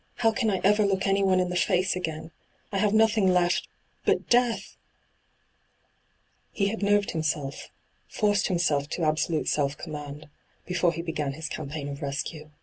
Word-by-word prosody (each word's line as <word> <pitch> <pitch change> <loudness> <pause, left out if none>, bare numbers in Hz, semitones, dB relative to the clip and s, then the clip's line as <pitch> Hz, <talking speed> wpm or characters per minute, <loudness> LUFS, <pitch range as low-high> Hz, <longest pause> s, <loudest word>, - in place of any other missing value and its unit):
' - - -40
How 225 - +5
can 225 -1 0
I 190 -3 0
ever 210 +2 +4
look 195 -2 +1
anyone 195 -1 +3
in 180 -1 +1
the 180 - -3
&ce 185 +1 +2
again? 160 -2 -4 0.4
I 195 - -1
have 210 0 +2
nothing 220 -2 +4
left 180 -1 +2 0.2
— - - -42
but - - +1
death 240 -1 +2 1.0
!' - - -42
He 200 -1 0
had 220 +1 -4
nerved 205 0 +2
himself, 155 -3 -3 0.4
forced 205 -2 +1
himself 155 -6 +1
to 170 - -3
absolute 155 +1 0
self 145 0 0
command, 150 -1 -7 0.4
before 180 -1 +1
he 165 0 -5
began 155 -4 -2
his 155 +2 -5
campaign 145 -1 -5
of 140 +1 -6
rescue. 150 +2 -4
175 Hz, 170 wpm, -27 LUFS, 155-200 Hz, 1.0 s, How